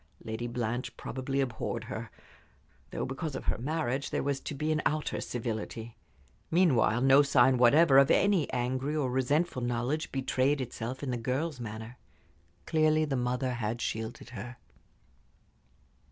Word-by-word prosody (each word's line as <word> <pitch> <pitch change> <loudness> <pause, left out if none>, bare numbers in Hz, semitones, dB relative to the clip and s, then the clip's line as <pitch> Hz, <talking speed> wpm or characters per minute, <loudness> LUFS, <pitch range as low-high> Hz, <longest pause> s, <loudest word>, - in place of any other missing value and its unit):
Lady 110 +2 -4
Blanche 120 0 -3
probably 135 +2 -2
abhorred 115 -2 -3
her; 115 -1 -6 0.8
though, - - -3
because 135 +2 -4
of - - -5
her - - 0
marriage, 140 -1 -1
there - - -1
was 140 -1 -1
to 145 - -6
be 150 +3 -1
an 155 -1 +1
outer 155 0 -1
civility. 115 -1 -4 0.5
Meanwhile 135 -9 +3
no 135 +2 +7
sign 130 -2 +4
whatever 135 +3 +6
of 140 - +5
any 195 -6 +3
angry 130 +4 -1
or 140 -5 0
resentful 130 +3 +1
knowledge 120 +6 -1
betrayed 135 +1 +1
itself 125 +1 -5
in 135 - -2
the 120 - -1
girl's 130 +5 -2
manner. 110 +1 -7 0.7
Clearly 155 0 +3
the 140 -3 -2
mother 125 +1 -1
had 115 0 -2
shielded 110 0 -4
her. 120 +2 -7
130 Hz, 145 wpm, -30 LUFS, 120-145 Hz, 0.8 s, no